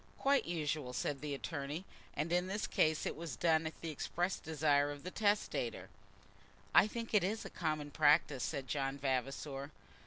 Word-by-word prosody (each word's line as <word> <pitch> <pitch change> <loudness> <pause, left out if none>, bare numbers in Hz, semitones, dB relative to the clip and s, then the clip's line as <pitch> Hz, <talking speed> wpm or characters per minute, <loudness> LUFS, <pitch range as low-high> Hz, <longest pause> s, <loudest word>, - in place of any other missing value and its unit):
"Quite 280 +1 +3
usual," 150 -6 -2
said 135 +2 -2
the 150 -2 -2
attorney; 145 +4 -4 0.3
"and 155 +4 0
in 180 +1 +2
this 205 +3 -1
case 155 0 +2
it - - -2
was 160 -4 -5
done 160 +1 +3
at 160 - -8
the 165 - -3
express 175 +5 -1
desire 145 -2 +2
of 145 -1 -7
the 180 - -5
testator." 205 0 0 0.8
"I - - +7
think 230 +1 -5
it 210 -4 +5
is 215 +4 -1
the - - -8
common 155 -2 -2
practice," 145 -3 +4
said 135 -1 -3
John 135 0 -1
Vavasor. 135 +1 -2
155 Hz, 175 wpm, -35 LUFS, 140-175 Hz, 0.8 s, I